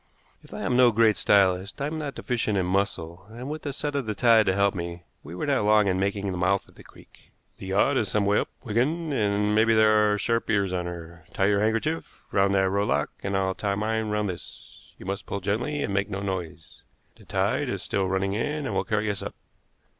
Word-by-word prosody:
If - - -18
I - - -6
am 125 - 0
no 125 -1 +6
great 110 -1 +4
stylist, 95 -1 +2
I 140 - -1
am 155 +2 -3
not 145 -3 -5
deficient 115 -4 -1
in 95 - +1
muscle, 90 -1 -2
and, 125 +5 -7
with 155 - -5
the 145 - -4
set 145 +1 -3
of 140 -5 -2
the 105 - -2
tide 115 -3 +5
to 95 - +2
help 100 0 +3
me, 85 -1 -6 0.2
we 80 +4 -9
were 90 - -3
not 140 -6 +1
long 105 0 +4
in 95 -1 +1
making 100 0 -1
the 90 - -4
mouth 100 +2 +1
of - - -17
the - - -15
creek. - - -19 0.3
"The 95 - -8
yacht 100 +8 +2
is 110 - +1
some 100 +1 +1
way 100 +1 +3
up, - - -3
Wigan, 145 +8 0
and 105 -3 +1
maybe 110 +1 +4
there 110 -1 +5
are 105 - +1
sharp 115 +3 -1
ears 100 -3 +1
on 90 -1 -2
her. 85 -1 -9
Tie 95 - +2
your 100 0 +3
handkerchief 115 +10 -2
round 100 0 +2
that 95 0 +3
rowlock, 100 -8 0
and 100 0 -1
I'll 95 -1 0
tie 100 +1 -2
mine 110 +1 -1
round 105 -1 0
this. 90 - -10
You - - -12
must 100 +1 -4
pull 100 - -3
gently 120 +10 -1
and 100 - -2
make 100 +1 0
no 100 -1 -3
noise. 85 -5 -6 0.4
The - - -18
tide - - 0
is - - -3
still 95 -1 -1
running 95 +1 0
in, 145 +7 -2
and - - -3
will - - +1
carry 105 -1 -1
us 100 - -4
up. - - -6
100 Hz, 235 wpm, -26 LUFS, 95-115 Hz, 0.4 s, no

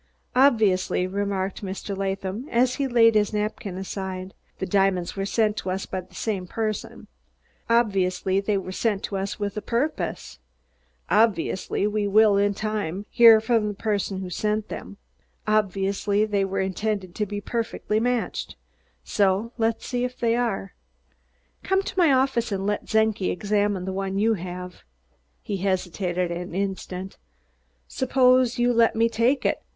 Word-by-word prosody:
"Obviously," 220 -9 +3
remarked 195 0 -2
Mr. 195 +1 -4
Latham 195 +5 -3
as 250 +2 +2
he 280 -1 0
laid 230 -2 +5
his 210 0 +2
napkin 210 -3 -3
aside, 190 -1 -5 0.2
"the - - -3
diamonds 190 -2 +1
were 195 0 -2
sent 215 0 +1
to 185 - -3
us 190 +1 -2
by 185 - -4
the 180 - -20
same 195 -5 -3
person; 215 +2 -4 0.6
obviously 195 -4 +2
they 200 0 0
were 185 -1 -5
sent 205 0 -1
to 200 - -4
us 195 +2 -3
with 205 -1 -3
a - - -2
purpose; 250 +9 -2 0.7
obviously 205 -3 +1
we 210 0 0
will, 210 0 +5
in 200 0 +2
time, 205 -3 -3
hear 230 -2 +8
from 220 -1 +1
the 205 - -4
person 200 -2 -2
who 185 - -5
sent 215 +3 -1
them; 200 - -7 0.5
obviously 200 0 +1
they 205 -2 0
were 195 0 -1
intended 190 -1 -2
to 210 +2 -2
be 205 +1 -4
perfectly 220 -1 -2
matched; 245 0 -2 0.5
so 200 +3 +1
let's 225 0 0
see 245 -1 -2
if 250 0 -3
they 230 -1 +1
are. 230 - -2 0.9
Come 385 +1 +1
to 380 -1 -4
my 335 -5 +5
office 260 -3 +2
and 195 -1 -2
let 205 0 -1
Czenki 220 -3 +1
examine 205 -1 0
the 190 - -3
one 195 0 -2
you 220 +3 +3
have." 180 -1 -7 0.6
He 200 - -3
hesitated 180 -1 -1
an 175 0 -5
instant. 190 -1 -4 0.7
"Suppose 255 -1 +3
you 245 0 +3
let 230 -1 +3
me 225 +1 +3
take 235 +4 +1
it. - - +1
205 Hz, 155 wpm, -24 LUFS, 190-225 Hz, 0.9 s, hear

